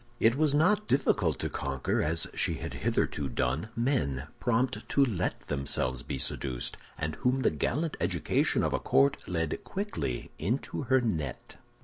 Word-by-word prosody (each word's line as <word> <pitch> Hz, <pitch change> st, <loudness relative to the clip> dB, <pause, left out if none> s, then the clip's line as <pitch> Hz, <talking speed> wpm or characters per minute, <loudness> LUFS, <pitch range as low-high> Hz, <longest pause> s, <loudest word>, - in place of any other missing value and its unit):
It 115 Hz, -, +5 dB
was 150 Hz, 0 st, +3 dB
not 205 Hz, +7 st, +3 dB
difficult 100 Hz, -, +2 dB
to -, -, 0 dB
conquer, 70 Hz, -1 st, -1 dB
as 80 Hz, +2 st, +1 dB
she -, -, +1 dB
had -, -, -5 dB
hitherto 70 Hz, -2 st, 0 dB
done, 65 Hz, -, -1 dB
men 75 Hz, -, 0 dB
prompt 125 Hz, +2 st, 0 dB
to 140 Hz, -, +4 dB
let 95 Hz, -8 st, -1 dB
themselves 70 Hz, -3 st, -1 dB
be 70 Hz, -, -4 dB
seduced, 65 Hz, -1 st, -2 dB, 0.2 s
and 75 Hz, +1 st, -3 dB
whom 130 Hz, +1 st, +1 dB
the -, -, +4 dB
gallant 160 Hz, +2 st, -1 dB
education -, -, +1 dB
of -, -, 0 dB
a -, -, +1 dB
court 70 Hz, +1 st, +3 dB
led 80 Hz, -3 st, -2 dB
quickly 195 Hz, -, -3 dB
into 115 Hz, -, -1 dB
her 130 Hz, +1 st, +4 dB
net. 80 Hz, -, -3 dB
90 Hz, 155 wpm, -30 LUFS, -, 0.2 s, It